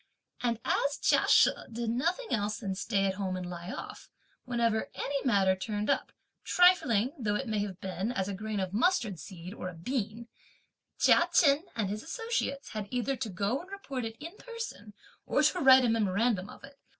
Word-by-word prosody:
And 235 -2 0
as 280 +1 +1
Chia - - +3
She - - +6 0.2
did 230 0 -2
nothing 345 - -1
else 210 -1 0
than 200 -4 -3
stay 195 0 0
at 190 - +1
home 190 -1 -3
and 180 -1 -5
lie 175 0 -7
off, - - -8 0.4
whenever 235 -3 0
any 280 -1 -2
matter 195 -6 +3
turned 210 +2 -2
up, - - -1 0.3
trifling 270 - +4
though 210 -4 0
it 265 +4 -2
may 215 -2 -1
have 200 -3 -4
been 190 +4 -3
as 190 -6 -2
a 200 - -3
grain 210 +1 -4
of 190 -1 -3
mustard 225 - +1
seed 180 +2 -9
or 185 - -5
a 180 - -10
bean, 225 +4 -3 0.7
Chia - - +5
Chen 300 0 +4
and 215 -3 0
his 210 +2 -4
associates 455 - -3
had 215 -2 -5
either 255 +2 -1
to 240 -4 -3
go 200 +7 -1
and 365 - -14
report 280 -11 -5
it 225 0 -5
in 330 +6 -8
person 460 - -8 0.3
or - - +2
to 365 - +3
write 265 -3 +7
a - - +2
memorandum 210 -1 +1
of - - -13
it. 275 0 -14
225 Hz, 195 wpm, -30 LUFS, 200-270 Hz, 0.7 s, write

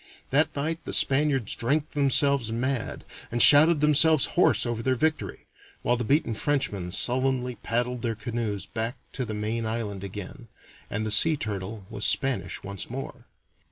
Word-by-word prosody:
That 150 +3 +2
night 160 +3 -3
the - - -5
Spaniards 135 -5 +2
drank 145 +6 -1
themselves 140 -3 +2
mad 125 +1 -3 0.3
and 120 - -2
shouted 150 +4 +7
themselves 150 0 +4
hoarse - - +3
over 120 -1 -3
their 130 +2 0
victory, 155 +4 -2 0.4
while 120 - +1
the 120 - -3
beaten 140 -1 0
Frenchmen 105 -8 -2
sullenly 125 +3 0
paddled 120 +3 -2
their 115 -1 -2
canoes 115 -5 -4
back 115 +3 -4 0.2
to 130 - -3
the 110 -1 -5
main 110 +2 -3
island 105 -4 -4
again, 105 +6 -8 0.4
and 105 +1 -3
the 110 - -2
Sea 155 +9 +5
Turtle 105 -2 -6
was 100 - -4
Spanish 135 -2 0
once 100 -1 -6
more. 135 +3 -8
120 Hz, 155 wpm, -25 LUFS, 110-140 Hz, 0.4 s, shouted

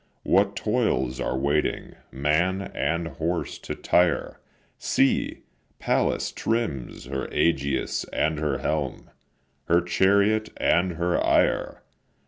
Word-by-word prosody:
What - - +2
toils 65 0 0
are 65 - -1
waiting, 70 +3 -1 0.2
man 85 +8 0
and 85 0 -1
horse 85 +3 -3
to - - -6
tire! 90 -1 +1 0.4
See! 70 - +1 0.3
Pallas - - 0
trims 110 - -3
her 65 +1 -4
aegis 70 -4 0
and 80 0 -1
her 75 -3 0
helm, 75 -5 -3 0.5
Her 85 +1 +4
chariot 100 +5 +2
and 90 +1 +2
her 85 +2 0
ire. - - +1
80 Hz, 110 wpm, -25 LUFS, 70-90 Hz, 0.5 s, Her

